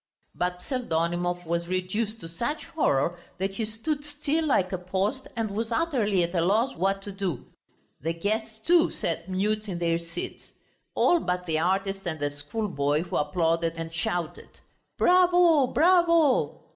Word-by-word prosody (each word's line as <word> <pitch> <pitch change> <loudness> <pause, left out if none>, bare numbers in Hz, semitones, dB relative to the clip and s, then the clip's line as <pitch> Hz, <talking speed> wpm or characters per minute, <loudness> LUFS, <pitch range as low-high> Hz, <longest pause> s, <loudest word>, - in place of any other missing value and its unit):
But 180 0 -2
Pseldonimov 175 - -1
was 170 +1 -1
reduced 205 +5 -2
to 165 - -7
such 235 - -3
horror 175 - 0 0.2
that 190 +1 -2
he 220 +3 -2
stood 285 +8 -3
still 300 +2 -1
like 190 -10 +2
a 185 - -1
post 195 +8 -2
and 225 -3 -2
was 225 +3 -3
utterly 230 - +1
at 170 +1 -3
a 170 - +2
loss 215 +9 +2
what 195 +3 0
to 205 - -6
do. 190 -9 -3 0.6
The 165 +4 -1
guests, 220 +5 -2
too, 340 -1 +5
sat 165 +2 -3
mute 210 +3 -1
in 180 - -3
their 170 -1 +1
seats. 165 0 -8 0.4
All 350 - +4
but 180 - -2
the 160 -2 0
artist 195 +3 0
and 160 -2 -3
the 145 0 -1
schoolboy, 145 -1 -1
who 175 - -6
applauded 165 +2 +1
and 165 0 -6
shouted, 170 0 -3 0.5
"Bravo, 350 -5 +5
bravo!" 335 -3 +3
190 Hz, 160 wpm, -27 LUFS, 170-235 Hz, 0.6 s, too